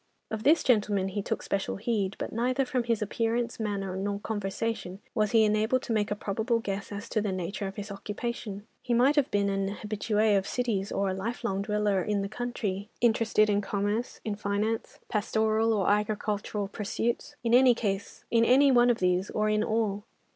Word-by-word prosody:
Of 220 Hz, -1 st, -3 dB
this 305 Hz, +8 st, +4 dB
gentleman 205 Hz, -6 st, +2 dB
he 200 Hz, +2 st, -2 dB
took -, -, -3 dB
special 195 Hz, -1 st, -2 dB
heed, 200 Hz, -2 st, -1 dB
but -, -, -5 dB
neither 255 Hz, +4 st, +1 dB
from 250 Hz, -1 st, -1 dB
his 230 Hz, -2 st, +1 dB
appearance, 230 Hz, +3 st, -1 dB
manner 200 Hz, -3 st, -2 dB
nor 200 Hz, +1 st, -2 dB
conversation 205 Hz, -2 st, -3 dB
was 215 Hz, -3 st, +1 dB
he 225 Hz, 0 st, +5 dB
enabled 220 Hz, +5 st, +2 dB
to 230 Hz, -, -2 dB
make 210 Hz, -2 st, +1 dB
a 205 Hz, -, -1 dB
probable 220 Hz, +3 st, -1 dB
guess 200 Hz, -3 st, -4 dB
as 205 Hz, +2 st, -6 dB
to 215 Hz, -, 0 dB
the 205 Hz, -2 st, -1 dB
nature 185 Hz, +2 st, -3 dB
of 195 Hz, -, -7 dB
his 205 Hz, 0 st, -6 dB
occupation. 205 Hz, 0 st, -5 dB, 0.2 s
He 240 Hz, -, 0 dB
might 260 Hz, +5 st, +4 dB
have 290 Hz, -3 st, +3 dB
been 200 Hz, -1 st, +1 dB
an 195 Hz, 0 st, 0 dB
habitué 215 Hz, 0 st, +1 dB
of 195 Hz, -, -7 dB
cities, 215 Hz, -6 st, -1 dB
or 195 Hz, -1 st, 0 dB
a -, -, -1 dB
life 225 Hz, +6 st, -4 dB
long 195 Hz, -4 st, -1 dB
dweller 210 Hz, -2 st, +1 dB
in 200 Hz, +1 st, 0 dB
the 195 Hz, -, -4 dB
country, 215 Hz, -4 st, -3 dB
interested 225 Hz, -2 st, +3 dB
in 205 Hz, -1 st, +2 dB
commerce, 205 Hz, +4 st, -2 dB
in 215 Hz, -, -1 dB
finance, 210 Hz, +2 st, -2 dB
pastoral 220 Hz, +1 st, +1 dB
or 205 Hz, -4 st, +1 dB
agricultural 210 Hz, 0 st, 0 dB
pursuits; 225 Hz, +3 st, -3 dB
in 235 Hz, -1 st, +1 dB
any 240 Hz, +2 st, +3 dB
one 245 Hz, -1 st, +5 dB
of 240 Hz, -, +3 dB
these, 180 Hz, 0 st, +1 dB
or 215 Hz, 0 st, 0 dB
in 215 Hz, 0 st, +2 dB
all. 215 Hz, -2 st, 0 dB
210 Hz, 185 wpm, -28 LUFS, 200-230 Hz, 0.2 s, he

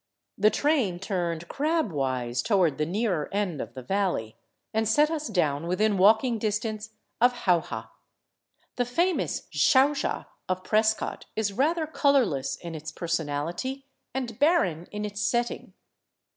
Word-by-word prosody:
The 210 Hz, +1 st, +4 dB
train 265 Hz, -, +1 dB
turned 175 Hz, -3 st, -3 dB
crab 305 Hz, -, 0 dB
wise 130 Hz, -4 st, -1 dB
toward 175 Hz, -, +2 dB
the 150 Hz, -, +1 dB
nearer 185 Hz, -4 st, -1 dB
end 195 Hz, -7 st, -1 dB
of -, -, -8 dB
the 130 Hz, -, -7 dB
valley, 180 Hz, -, -1 dB, 0.4 s
and 220 Hz, 0 st, +1 dB
set 300 Hz, +7 st, +4 dB
us 305 Hz, -2 st, -2 dB
down 160 Hz, -6 st, 0 dB
within 205 Hz, +4 st, +2 dB
walking 220 Hz, +5 st, +4 dB
distance 215 Hz, 0 st, -3 dB, 0.3 s
of 245 Hz, 0 st, +3 dB
Jauja. 160 Hz, -, +1 dB, 0.9 s
The 245 Hz, -, +1 dB
famous 340 Hz, +9 st, 0 dB
" -, -, -26 dB
Xauxa 275 Hz, +2 st, +3 dB
" -, -, -47 dB
of 185 Hz, 0 st, -1 dB
Prescott 215 Hz, +2 st, 0 dB
is 210 Hz, -2 st, 0 dB
rather 315 Hz, -, +1 dB
colorless 270 Hz, -, +2 dB
in 170 Hz, -1 st, -8 dB
Its 155 Hz, 0 st, -6 dB
person 165 Hz, -3 st, -2 dB
ality 175 Hz, -, -3 dB, 0.3 s
and 245 Hz, -4 st, -4 dB
barren 190 Hz, -, +2 dB
in 210 Hz, 0 st, -3 dB
its 205 Hz, 0 st, -5 dB
setting. 240 Hz, 0 st, -1 dB
205 Hz, 145 wpm, -27 LUFS, 170-245 Hz, 0.9 s, The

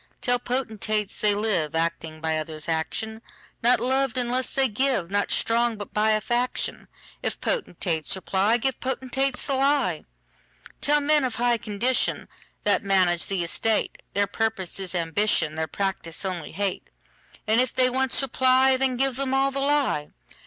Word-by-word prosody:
Tell 245 Hz, 0 st, +2 dB
potentates, 220 Hz, -4 st, -2 dB
they 210 Hz, -1 st, +4 dB
liveActing 165 Hz, -5 st, -1 dB
by 160 Hz, -1 st, 0 dB
others' 155 Hz, 0 st, -5 dB
action; 220 Hz, +7 st, -2 dB, 0.4 s
Not 245 Hz, +2 st, +4 dB
loved 265 Hz, -1 st, 0 dB
unless 250 Hz, +1 st, +1 dB
they 270 Hz, -1 st, +3 dB
give, 225 Hz, -6 st, 0 dB
Not 205 Hz, 0 st, +1 dB
strong, 235 Hz, 0 st, +1 dB
but 205 Hz, -, -8 dB
by 215 Hz, +1 st, +3 dB
a 215 Hz, -, +1 dB
faction:If 245 Hz, +2 st, -3 dB
potentates 175 Hz, -, -1 dB
reply, 195 Hz, +4 st, +1 dB
Give 260 Hz, +2 st, -2 dB
potentates 265 Hz, 0 st, -1 dB
the 275 Hz, -, -1 dB
lie. 270 Hz, -, +1 dB, 0.8 s
Tell 295 Hz, +1 st, +3 dB
men 295 Hz, 0 st, +3 dB
of 255 Hz, -3 st, -1 dB
high 240 Hz, -1 st, +1 dB
condition, 220 Hz, +5 st, 0 dB, 0.4 s
That 205 Hz, -, +2 dB
manage 185 Hz, -3 st, +2 dB
the 190 Hz, -3 st, -1 dB
estate, 215 Hz, +6 st, 0 dB
Their 200 Hz, 0 st, +3 dB
purpose 210 Hz, -4 st, -2 dB
is 190 Hz, -1 st, -4 dB
ambition, 165 Hz, -1 st, +1 dB
Their 160 Hz, 0 st, -2 dB
practice 190 Hz, 0 st, -3 dB
only 180 Hz, -5 st, -4 dB
hate:And 205 Hz, +4 st, -3 dB
if 255 Hz, -, 0 dB
they 255 Hz, -1 st, +3 dB
once 265 Hz, +1 st, +2 dB
reply, 260 Hz, 0 st, +3 dB
Then 260 Hz, -1 st, 0 dB
give 265 Hz, -1 st, +1 dB
them 270 Hz, -1 st, 0 dB
all 270 Hz, +1 st, +2 dB
the 275 Hz, -, -3 dB
lie. 275 Hz, -, +1 dB
220 Hz, 150 wpm, -25 LUFS, 190-260 Hz, 0.8 s, they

